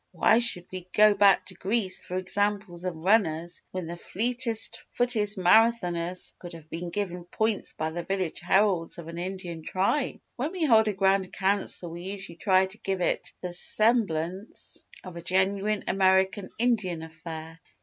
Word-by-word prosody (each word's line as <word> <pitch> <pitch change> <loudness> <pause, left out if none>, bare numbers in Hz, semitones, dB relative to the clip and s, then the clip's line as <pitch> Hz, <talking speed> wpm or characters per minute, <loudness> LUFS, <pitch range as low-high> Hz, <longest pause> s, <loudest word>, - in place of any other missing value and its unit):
"Why 225 - +4
should 235 -7 +3
we 185 -1 -7
go 210 0 +6
back 200 -1 +4
to 185 - -8
Greece 190 +1 -1
for 180 - -5
examples 195 -1 -2
of 180 -2 -2
runners 170 -2 +1
when 185 -2 -5
the 170 +1 -6
fleetest 230 +5 +1
footed 245 -4 +1
Marathoners 180 -3 +2
could 175 -1 -10
have 160 -2 -12
been 170 +1 -5
given 180 -1 -4
points 220 +3 -1
by 155 0 -3
the 175 +2 -4
village 185 -1 -2
heralds 185 -1 +1
of 170 -2 -9
an 170 +1 -7
Indian 180 -2 -5
Tribe? 195 - -1 0.2
"When 290 +8 -3
we 355 -4 0
hold 220 -5 +5
a 210 - 0
Grand 190 -1 +1
Council 190 -3 0
we 170 +1 -8
usually 190 -2 -7
try 190 -1 +3
to 190 +3 -11
give 195 -1 -2
it - - -1
the 180 -1 -5
semblance 195 -2 +1 0.2
of 180 -2 -9
a - - -6
genuine 195 +4 0
American 190 +1 +2
Indian 205 -9 0
affair. 160 0 -9
190 Hz, 165 wpm, -27 LUFS, 175-210 Hz, 0.2 s, go